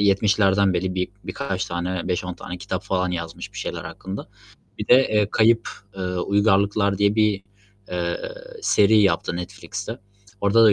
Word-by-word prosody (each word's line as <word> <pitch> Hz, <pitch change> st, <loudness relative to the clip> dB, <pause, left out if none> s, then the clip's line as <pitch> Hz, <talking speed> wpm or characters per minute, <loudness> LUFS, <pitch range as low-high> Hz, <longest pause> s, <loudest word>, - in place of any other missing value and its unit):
70'lerden 100 Hz, -1 st, +3 dB
beri 90 Hz, +1 st, -1 dB
bir 90 Hz, 0 st, -1 dB, 0.2 s
birkaç 95 Hz, -10 st, -3 dB
tane 85 Hz, +1 st, -3 dB
5-10 90 Hz, 0 st, -2 dB
tane 90 Hz, +1 st, -7 dB
kitap 95 Hz, +2 st, -4 dB
falan 90 Hz, -1 st, 0 dB
yazmış 85 Hz, -2 st, -5 dB
bir -, -, -8 dB
şeyler -, -, -4 dB
hakkında. 95 Hz, +1 st, -7 dB, 0.5 s
Bir -, -, -5 dB
de, -, -, +9 dB
eee, 105 Hz, -2 st, +2 dB
Kayıp, 115 Hz, +1 st, +3 dB, 0.3 s
eee, 95 Hz, -, -4 dB
Uygarlıklar 100 Hz, +2 st, +2 dB
diye 100 Hz, 0 st, +3 dB
bir, 105 Hz, -3 st, +2 dB, 0.5 s
eee, 85 Hz, -1 st, -1 dB, 0.4 s
seri 105 Hz, -, +5 dB
yaptı 85 Hz, -4 st, +2 dB
Netflix'te. 100 Hz, +5 st, -6 dB, 0.4 s
Orada 105 Hz, +3 st, +5 dB
da 110 Hz, -, +7 dB
100 Hz, 150 wpm, -23 LUFS, 90-105 Hz, 0.5 s, de